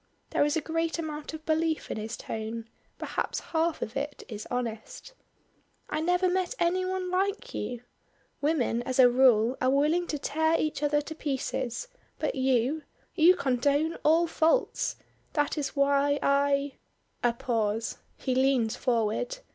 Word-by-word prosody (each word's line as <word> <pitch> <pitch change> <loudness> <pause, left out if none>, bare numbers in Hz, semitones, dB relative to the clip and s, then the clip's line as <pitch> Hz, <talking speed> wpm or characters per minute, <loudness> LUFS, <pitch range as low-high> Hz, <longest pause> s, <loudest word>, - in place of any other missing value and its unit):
There - - +3
is 295 +2 +1
a - - 0
great 330 +2 -1
amount 305 -2 -5
of 315 0 -11
belief 320 0 0
in - - -3
his 220 +2 -5
tone, 225 +1 -5 0.3
perhaps - - -2
half 325 0 -1
of 220 - -7
it 285 +1 -4
is 215 -2 -7
honest. 245 - -5 0.8
"I 305 - 0
never 360 +3 +2
met 370 +5 0
any 355 +2 +1
one 370 0 -2
like 400 +6 -1
you. 245 -1 -4 0.6
Women 285 -6 +1
as 255 +1 -3
a 250 -2 +7
rule 245 -1 +4
are 255 - +3
willing 305 +6 +2
to 300 - -2
tear 315 +3 +1
each 305 -2 -1
other 295 0 +2
to 305 +2 -7
pieces 270 - -3 0.3
but - - -1
you 265 +2 +1 0.3
you 350 +2 +6
condone 285 +4 +1
all 325 +3 +5
faults; 330 +8 +1 0.4
that 295 -1 +1
is 295 -2 -3
why 280 0 +3
I 280 0 +2 0.2
" - - -43
A 240 - +4
pause. 225 -2 -1 0.2
He 260 - -1
leans 255 -4 +2
forward. 240 - 0
285 Hz, 155 wpm, -28 LUFS, 250-325 Hz, 0.8 s, a